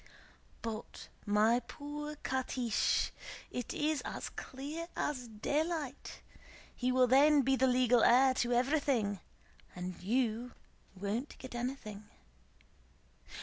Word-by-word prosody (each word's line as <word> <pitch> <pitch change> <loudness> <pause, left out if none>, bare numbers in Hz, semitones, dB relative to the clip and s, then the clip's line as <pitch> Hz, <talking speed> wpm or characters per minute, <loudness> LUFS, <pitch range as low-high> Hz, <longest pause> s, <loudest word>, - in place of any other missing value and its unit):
"But, 225 -1 -6 0.2
my 215 +3 +4
poor 295 +4 -7
Catiche, 255 -3 0 0.4
it 245 - -4
is 305 0 0
as - - -5
clear 295 +6 -6
as 255 -5 -2
daylight! 285 +5 -3 0.5
He 250 0 0
will 255 0 +5
then 280 +3 +6
be 270 +1 +3
the 265 0 +3
legal 250 -2 +4
heir 260 +2 +6
to 240 -1 0
everything 245 -5 +1 0.6
and 180 0 -6
you 235 +3 0 0.4
won't 205 +8 -3
get 260 -1 -9
anything. 240 -4 -5
255 Hz, 105 wpm, -33 LUFS, 230-280 Hz, 0.6 s, then